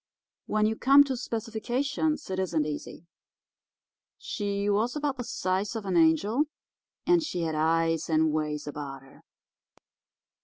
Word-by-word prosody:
When 215 0 +2
you 220 +1 +1
come 275 +5 +7
to 270 -2 -3
specifications 250 +6 -2
it 190 - -2
isn't 170 -5 0
easy. 150 +2 -6 1.1
She 200 -1 -3
was 215 +5 +1
about 290 -2 -1
the 245 - -3
size 195 0 -2
of 220 -2 -4
an 190 -2 -1
angel, 175 - +3 0.6
and 350 -1 +4
she 240 - -3
had 160 -1 -1
eyes, 165 +1 +1
and 160 -1 +3
ways 150 -1 -2
about 140 -2 -6
her. 135 - -18
200 Hz, 140 wpm, -28 LUFS, 160-245 Hz, 1.1 s, come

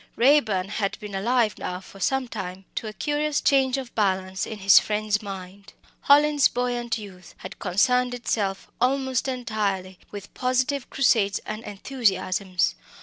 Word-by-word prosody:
Raeburn 230 -8 +3
had 205 -1 -2
been 210 -2 -8
alive 225 +2 +1
now 180 0 -4
for 195 +1 -14
some 265 +6 0
time 190 -4 -6
to 225 - -4
a - - -4
curious 295 +3 -1
change 270 -1 +3
of 260 -3 -6
balance 190 -2 0
in 220 - -6
his 195 -1 +7
friend's 210 -1 -1
mind. 195 0 -9 0.3
Hallin's 290 0 +5
buoyant 240 -1 -2
youth 190 -4 -12
had 185 - -10
concerned 245 +7 +2
itself 205 -5 -2
almost 265 0 +1
entirely 210 -7 -2
with 205 -1 -9
positive 255 +2 -1
crusades 220 -7 +2
and 215 +1 -5
enthusiasms. 195 - 0
215 Hz, 145 wpm, -25 LUFS, 195-255 Hz, 0.3 s, his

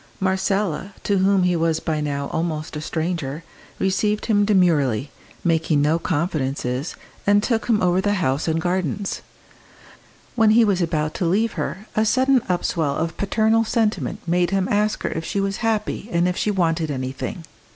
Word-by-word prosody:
Marcella, 190 0 -1
to 200 -2 +1
whom 195 0 +3
he 180 -1 +2
was 165 -1 +1
by 155 -2 -2
now 140 -1 -2
almost 160 -1 -3
a 150 - -4
stranger, 160 -2 -3 0.3
received 210 +2 0
him 205 -2 +3
demurely, 150 - +2 0.3
making 160 -3 +2
no 150 +3 +2
confidences, 145 -5 -2 0.3
and 205 0 +4
took 225 -2 0
him 220 -4 +2
over 180 +1 +3
the 205 +1 +1
house 145 -6 0
and 160 0 +1
gardens. 185 +2 -2 1.1
When 225 -3 +4
he 235 - +6
was 195 -3 +1
about 155 -2 -1
to 180 - 0
leave 210 +7 +2
her 200 +3 -4
a 215 - +3
sudden 260 +3 +3
upswell 165 -5 0
of 165 +1 -2
paternal 220 +3 +2
sentiment 220 -1 -1
made 175 +1 +2
him 195 0 0
ask 210 +1 +1
her - - 0
if 160 - -4
she 200 - -2
was 195 0 -1
happy 220 -1 -2
and 170 -1 +2
if 180 - -1
she 210 - 0
wanted 165 -5 0
anything. 130 +5 -4
180 Hz, 170 wpm, -22 LUFS, 160-205 Hz, 1.1 s, he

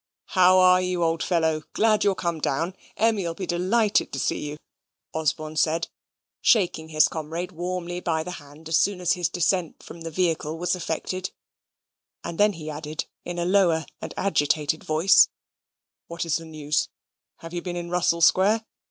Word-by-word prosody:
"How 185 -1 +6
are 185 0 +6
you, 180 -1 -1
old 165 0 0
fellow? 160 -3 +1
Glad 215 -1 +3
you're 200 -2 +2
come 170 -3 -3
down. 165 +8 -1 0.2
Emmy'll 205 -7 +1
be 190 - -4
delighted 200 +5 +1
to 135 - -4
see - - 0
you," 150 - -7 0.6
Osborne 155 0 -2
said, 165 +2 +1 0.5
shaking 175 -7 +2
his 155 -1 +4
comrade 165 +3 -5
warmly 175 0 -4
by 160 -3 -1
the 180 - -6
hand 145 +3 -14
as 160 0 +3
soon 200 -2 +1
as 180 - +2
his 175 -2 -1
descent 175 -1 -1
from 170 - -11
the 165 - -5
vehicle 160 -2 -1
was 180 +2 0
effected 180 +2 -3 0.9
and 165 - -6
then 205 0 +4
he 160 -3 -9
added, 155 +1 -5 0.2
in 175 0 -5
a 175 - -1
lower 175 -4 +3 0.2
and - - -6
agitated 155 -4 +1
voice, 160 +5 +5 0.8
"What's 170 -1 -2
the 165 - -9
news? 150 -2 -1 0.5
Have 165 +1 -9
you 175 - -3
been 175 -1 -5
in 175 0 -5
Russell 170 -1 +1
Square? 205 +6 +4
170 Hz, 170 wpm, -25 LUFS, 160-185 Hz, 0.9 s, How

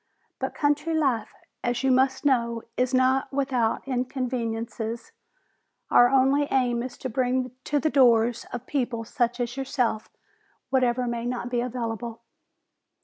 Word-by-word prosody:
But - - -3
country 300 +2 +1
life, 260 -8 +1 0.3
as 240 +1 -1
you 265 - +3
must 260 +2 +2
know, 235 -4 +1
is 250 0 +1
not 260 +1 +2
without 265 -4 0
inconveniences. 235 -3 -3 0.8
Our 245 0 +7
only 270 +2 +3
aim 245 -3 +1
is 250 0 -6
to - - -4
bring 255 +1 0
to 295 - +1
the 310 +3 0
doors 240 -3 +4
of 245 0 -6
people 250 -5 -2
such 240 +2 -1
as 240 0 -2
yourself 255 -5 -1 0.6
whatever 250 -1 +2
may 235 0 -2
not 245 0 -3
be 240 -1 +1
available." 235 -2 -4
250 Hz, 140 wpm, -26 LUFS, 235-265 Hz, 0.8 s, Our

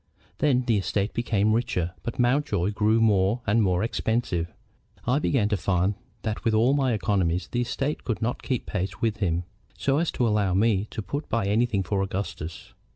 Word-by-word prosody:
Then 130 -4 +3
the 115 -4 +2
estate 100 +2 -1
became 110 -3 +1
richer, 90 -7 0
but 120 - -5
Mountjoy 120 -7 +1
grew 110 +2 +2
more 105 +1 +3
and 115 +3 +3
more 95 -1 +2
expensive. 110 -7 -1 0.5
I 125 +4 +2
began 130 -8 +1
to 105 - +1
find 90 +2 +1 0.3
that 110 -1 -3
with 115 -2 +2
all 120 +5 +4
my 135 -4 +2
economies 95 -5 0
the 120 - -1
estate 135 +5 -2
could 115 - -2
not 120 +2 -2
keep 130 -4 -2
pace 95 -1 -3
with 115 -3 0
him, 90 -4 0 0.3
so 140 +1 +1
as 170 - +1
to 120 - +1
allow 105 -4 +1
me 105 0 +2
to 110 - -5
put 140 - -4
by 115 -2 0
anything 105 0 +1
for 95 +2 -1
Augustus. 95 -4 -5
110 Hz, 185 wpm, -26 LUFS, 95-120 Hz, 0.5 s, all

